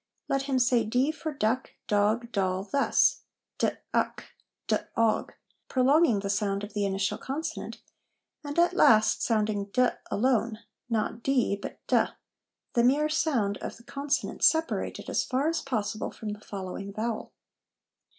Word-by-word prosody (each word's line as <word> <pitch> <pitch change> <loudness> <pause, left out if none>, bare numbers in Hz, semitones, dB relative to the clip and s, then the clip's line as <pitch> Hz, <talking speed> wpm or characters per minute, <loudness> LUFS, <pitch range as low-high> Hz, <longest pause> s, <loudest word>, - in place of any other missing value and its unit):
Let 275 +1 -1
him 265 - +2
say 245 -1 +3
d 250 +7 +1
for 315 0 -5
duck, 255 -2 -1
dog, 215 +3 +1
doll, 190 -2 0
thus: 280 - +2 0.4
d - - +3 0.2
uck, - - -1 0.3
d - - +2 0.2
og, 230 -1 +2 0.3
prolonging 260 -3 +3
the 200 - -3
sound 200 -1 -1
of 205 - -7
the 205 -2 0
initial 195 0 -1
consonant, 290 +5 -5 0.6
and 290 +1 -6
at 345 +1 +4
last 220 - +5
sounding 215 -3 +1
d 250 +5 +2 0.2
alone, 230 -1 +1 0.3
not 225 0 -1
dee, 250 -6 +2
but?, 200 - -8 0.9
the 235 - +2
mere 290 +5 +3
sound 250 -11 +1
of - - -6
the 235 - -17
consonant 280 +2 -2
separated 320 0 +2
as - - +1
far 270 +3 0
as 330 +1 0
possible 220 -4 -2
from 215 - -7
the 210 0 -6
following 195 0 -6
vowel. 220 +2 -3
235 Hz, 145 wpm, -28 LUFS, 205-275 Hz, 0.9 s, last